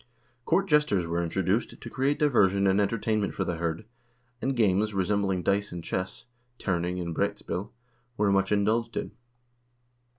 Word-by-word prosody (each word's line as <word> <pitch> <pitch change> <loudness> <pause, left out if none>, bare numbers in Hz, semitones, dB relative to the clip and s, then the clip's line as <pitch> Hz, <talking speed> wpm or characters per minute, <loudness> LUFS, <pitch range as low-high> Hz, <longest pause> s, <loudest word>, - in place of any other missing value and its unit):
Court 195 +4 +2
jesters 150 - +3
were 85 +1 -1
introduced 95 +6 -1
to - - -8
create 135 +2 +1
diversion 100 -9 +3
and 95 +1 +4
entertainment 105 0 0
for 95 - 0
the 90 -3 -2
hird, 85 +4 -2 0.6
and 135 0 0
games, 105 -2 +2
resembling 95 -1 0
dice 100 +3 +1
and 85 -1 -6
chess 95 +3 -4 0.3
(terning 90 -1 -1
and 85 -2 -3
broetspil), 95 +3 -2 0.5
were 105 -1 +2
much 95 0 +2
indulged 110 +3 +1
in. - - -3
100 Hz, 145 wpm, -28 LUFS, 90-110 Hz, 0.6 s, and